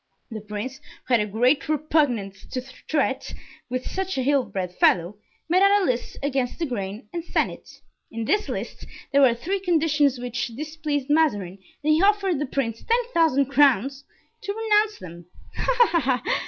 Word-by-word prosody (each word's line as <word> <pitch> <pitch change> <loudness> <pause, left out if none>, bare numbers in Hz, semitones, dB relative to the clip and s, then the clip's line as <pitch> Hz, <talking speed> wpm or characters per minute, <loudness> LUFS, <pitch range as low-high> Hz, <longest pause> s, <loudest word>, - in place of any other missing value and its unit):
The 220 -1 -5
prince, 210 +5 -6 0.3
who 255 - -1
had 235 - +6
a 210 - -1
great 250 +8 +1
repugnance 270 -10 0
to 255 - -4 0.3
treat 275 -3 -1 0.3
with 255 0 -3
such 380 -2 -3
an 260 - 0
ill 280 -2 +3
bred 180 -2 -4
fellow, 175 +3 +3 0.3
made 355 +3 +3
out 400 +1 +5
a 390 - 0
list, 250 -3 -2
against 265 -3 -1
the 335 - -1
grain, 210 -4 -5
and 340 -1 -3
sent - - 0
it. - - -13 0.4
In 230 0 -4
this 420 - +1
list - - -6 0.2
there 280 - +4
were 250 -4 +5
three 375 +12 -2
conditions 310 -6 +2
which 245 -1 -3
displeased 300 -1 -3
Mazarin 205 - +1 0.2
and 310 +1 +3
he 315 - +3
offered 395 -5 +2
the 295 - -2
prince 230 -4 -2
ten 475 +2 +2
thousand 305 -5 +3
crowns 275 -1 +3 0.4
to 400 - -3
renounce 430 -1 +2
them." 175 -1 -11 0.3
"Ah, - - -3 0.3
ha, 340 - +3
ha!" 260 -5 0
275 Hz, 180 wpm, -24 LUFS, 235-320 Hz, 0.4 s, had